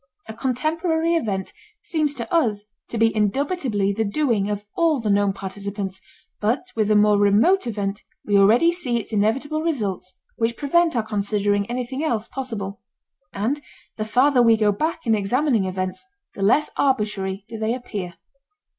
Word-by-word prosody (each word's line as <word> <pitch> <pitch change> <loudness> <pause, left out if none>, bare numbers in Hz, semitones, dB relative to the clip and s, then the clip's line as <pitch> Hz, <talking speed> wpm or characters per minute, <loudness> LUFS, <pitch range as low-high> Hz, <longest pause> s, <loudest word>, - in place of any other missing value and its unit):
A 220 - -6
contemporary 320 +7 0
event 200 - -2 0.3
seems 305 -3 -1
to 235 +2 -5
us 215 -11 +1 0.2
to 235 - -4
be 225 0 +3
indubitably 215 - 0
the 220 +2 0
doing 215 -2 0
of 205 0 -3
all 330 -4 +2
the 215 -3 0
known 200 0 +3
participants, 195 0 -5 0.4
but 225 +9 0
with 215 -2 +1
a 215 - +4
more 210 0 +5
remote 220 - +4
event 205 -2 -3 0.2
we 205 - +1
already 220 +12 +5
see 265 -9 -2
its 225 0 -6
inevitable 265 +9 0
results 205 - -2 0.2
which 230 0 0
prevent 330 +2 +2
our 230 - +1
considering 205 -1 0
anything 250 +3 -3
else 235 -8 -1
possible. 215 -7 -5 0.5
And 240 +9 -2 0.4
the 215 - -1
farther 250 +4 +3
we 230 -1 +5
go 210 -1 +3
back 315 +9 -2
in 225 - +3
examining 225 +2 +1
events 185 - -3 0.3
the - - -8
less 235 +10 +3
arbitrary 210 -7 0
do 225 -1 -7
they 220 +2 0
appear. 200 -8 -6
220 Hz, 160 wpm, -22 LUFS, 205-270 Hz, 0.5 s, more